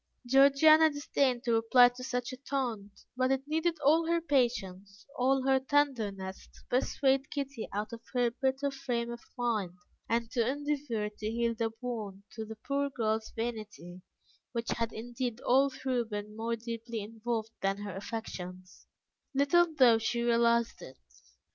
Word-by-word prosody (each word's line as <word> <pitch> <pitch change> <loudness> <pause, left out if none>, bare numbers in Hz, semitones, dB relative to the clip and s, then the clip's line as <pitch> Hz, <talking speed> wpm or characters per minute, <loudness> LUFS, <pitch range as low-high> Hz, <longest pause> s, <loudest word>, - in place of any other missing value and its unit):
Georgiana 280 +5 +6
disdained 275 -4 0
to 235 - +1
reply 230 +2 +6
to 245 +1 -10
such 250 0 -3
a - - -7
taunt, 240 -8 -4
but 255 +1 +1
it 270 +1 -1
needed 320 +2 0
all 320 +3 +4
her 335 0 +2
patience, 205 - -1
all 265 +1 +2
her 265 0 +4
tenderness, 225 -9 -1
to - - -17
persuade 265 +1 +1
Kitty 275 -4 -4
out 210 +3 -3
of 230 - -7
her 245 -1 +3
bitter 265 +3 -1
frame 240 -3 -3
of 235 - -6 0.2
mind, 215 -7 -1 0.3
and 230 0 0
to 245 - +1
endeavour 275 -4 -2
to 210 0 -5
heal 235 +1 0
the 225 0 -2
wound 215 -6 -5
to 220 - -6
the 220 +1 -8
poor 280 +5 -1
girl's 220 -4 -1
vanity, 210 -6 -5 0.5
which 235 -1 -2
had 230 -1 -1
indeed 240 +1 -4
all 270 +3 +4
through 255 -2 -2
been 210 -1 -6
more 230 +1 -2
deeply 230 0 -5
involved 225 +1 -4
than 195 0 0
her 205 -2 -6
affections, 185 -3 -7 0.5
little 330 +5 +4
though 250 -7 +5
she 235 +1 -1
realized 235 0 +2
it. 130 - -11
235 Hz, 155 wpm, -31 LUFS, 220-270 Hz, 0.5 s, Georgiana